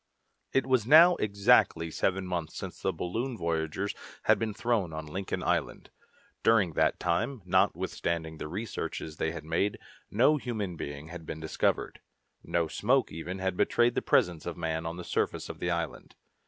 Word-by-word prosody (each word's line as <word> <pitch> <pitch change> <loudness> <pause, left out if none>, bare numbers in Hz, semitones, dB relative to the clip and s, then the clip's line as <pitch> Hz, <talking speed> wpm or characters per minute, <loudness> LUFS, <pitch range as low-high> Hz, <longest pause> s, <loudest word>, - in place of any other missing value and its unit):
It 135 - +2
was 130 -4 +2
now 165 +5 +9
exactly 100 -5 +3
seven 95 +2 0
months 90 -3 -4
since - - -7
the - - +1
balloon 115 +8 -3
voyagers 85 +4 -1 0.3
had - - +4
been 110 -1 -1
thrown 110 -6 0
on 80 0 -5
Lincoln 95 +6 -4
Island. - - -1 0.5
During 105 -7 +4
that - - +2
time, 105 +7 -1
notwithstanding 80 -2 0
the - - -4
researches 90 -4 -5
they 80 - 0
had 80 -2 -7
made, 100 +5 0 0.3
no 130 +8 +4
human 110 -9 -3
being 70 0 -6
had 85 -1 -8
been 80 - -5
discovered. 80 0 -1 0.4
No 85 -1 0
smoke 125 - +1
even 80 +4 -5
had 95 -1 -1
betrayed 120 +5 +3
the - - 0
presence 85 -2 +2
of 85 - -4
man 80 -1 -2
on 85 +1 -5
the 90 - -6
surface - - -1
of - - -7
the 85 - -1
island. 85 -2 -3
90 Hz, 170 wpm, -29 LUFS, 80-110 Hz, 0.5 s, now